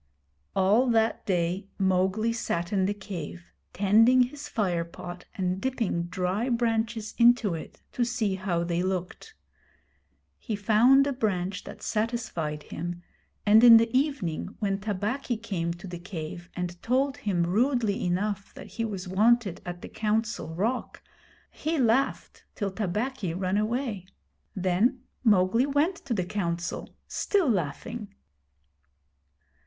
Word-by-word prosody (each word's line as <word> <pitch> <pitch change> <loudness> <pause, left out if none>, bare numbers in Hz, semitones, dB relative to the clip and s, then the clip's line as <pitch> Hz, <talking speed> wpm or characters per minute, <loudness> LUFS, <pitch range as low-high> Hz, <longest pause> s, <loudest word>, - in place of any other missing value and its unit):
All 205 +7 +4
that 225 -1 +1
day 180 +1 0
Mowgli 190 +4 +1
sat 175 -6 -2
in 190 -2 +2
the 205 - 0
cave 180 -4 -7 0.3
tending 225 +6 +5
his 285 +4 -6
fire 180 -6 0
pot 175 +1 -9
and 185 0 -1
dipping 230 -10 -1
dry 185 +6 -1
branches 225 -2 0
into 235 -5 +5
it 165 - -8
to 245 - 0
see 235 -4 0
how 185 -3 -1
they 170 0 -1
looked. 185 - -4 1.0
He 225 - -3
found 230 +7 +5
a 280 - 0
branch 195 -6 -2
that - - -10
satisfied 210 -10 -2
him, 175 +2 -6 0.4
and 215 +2 +7
in 235 -2 +11
the 230 +2 +1
evening 240 - -1
when 195 -2 -1
Tabaqui 215 +5 -2
came 190 -7 -2
to 175 - -11
the 175 -2 -6
cave 175 -1 -7
and 175 -1 -4
told 265 +3 +1
him 185 -5 0
rudely 220 +3 +1
enough 195 +3 -2
that - - -9
he 230 - -4
was 195 -4 -5
wanted 210 0 +2
at 175 0 -6
the - - -6
Council 215 -5 -2
Rock, 225 +8 -2 0.5
he 320 +2 -2
laughed 260 +1 +1
till 200 -2 -2
Tabaqui 210 -1 -2
ran 185 +1 0
away. 215 -4 -2 0.5
Then 195 +8 +1 0.2
Mowgli 215 +3 +4
went 295 +6 +1
to 245 -4 -1
the 185 -3 -1
Council, 175 -3 -3
still 395 -6 +1
laughing. 200 - -2
205 Hz, 135 wpm, -27 LUFS, 180-235 Hz, 1.0 s, in